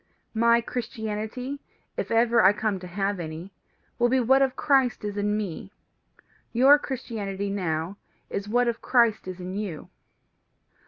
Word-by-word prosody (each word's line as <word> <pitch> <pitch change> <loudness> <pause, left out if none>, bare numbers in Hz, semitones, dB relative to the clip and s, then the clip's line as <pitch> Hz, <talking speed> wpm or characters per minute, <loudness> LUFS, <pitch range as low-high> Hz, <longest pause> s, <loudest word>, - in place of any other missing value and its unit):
My 235 +1 +4
Christianity, 235 +3 -4 0.4
if - - -3
ever 235 +1 +4
I 190 +2 +7
come 210 -2 -1
to 180 - -9
have 195 +2 -2
any, 165 +3 -7 0.5
will 240 0 +4
be 260 +1 +3
what 265 +3 +4
of 265 -2 +2
Christ 265 -6 +2
is 205 -1 -3
in 205 +1 0
me; 195 -2 -5 0.8
your 270 +5 +6
Christianity 205 -8 -4
now 175 -1 -2 0.3
is 200 +1 -4
what 245 +2 +2
of 235 -1 -1
Christ 235 -6 +2
is 185 0 -6
in 180 +1 -6
you. 195 -6 -5
215 Hz, 150 wpm, -26 LUFS, 195-240 Hz, 0.8 s, I